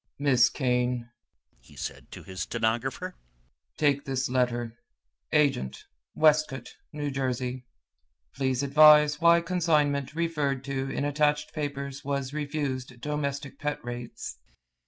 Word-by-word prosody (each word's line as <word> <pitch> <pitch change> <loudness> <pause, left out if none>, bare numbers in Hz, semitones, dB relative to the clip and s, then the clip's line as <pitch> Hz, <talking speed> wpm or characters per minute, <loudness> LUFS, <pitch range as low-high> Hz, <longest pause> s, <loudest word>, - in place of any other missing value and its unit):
"Miss 130 -4 +4
Kane," 125 -2 -1 0.5
he - - -19
said - - -7
to - - -10
his 95 0 -7
stenographer, 120 - -2 0.6
"take 145 -2 +2
this 135 -1 -2
letter. 120 -2 -1 0.5
'Agent, 140 - +1 0.3
Westcote, 150 -5 +2 0.2
N. 145 -2 -3
J. 130 -1 -2 0.7
Please 130 -1 0
advise 150 +1 +6
why 170 0 +6
consignment 155 -5 +1
referred 150 -5 -1
to 135 0 -3
in 140 - -2
attached 150 +1 +1
papers 140 -2 -4
was 140 -1 -2
refused 140 -4 -3
domestic 140 0 -3
pet 150 0 -2
rates."' 120 -1 -6
140 Hz, 115 wpm, -27 LUFS, 125-150 Hz, 0.7 s, advise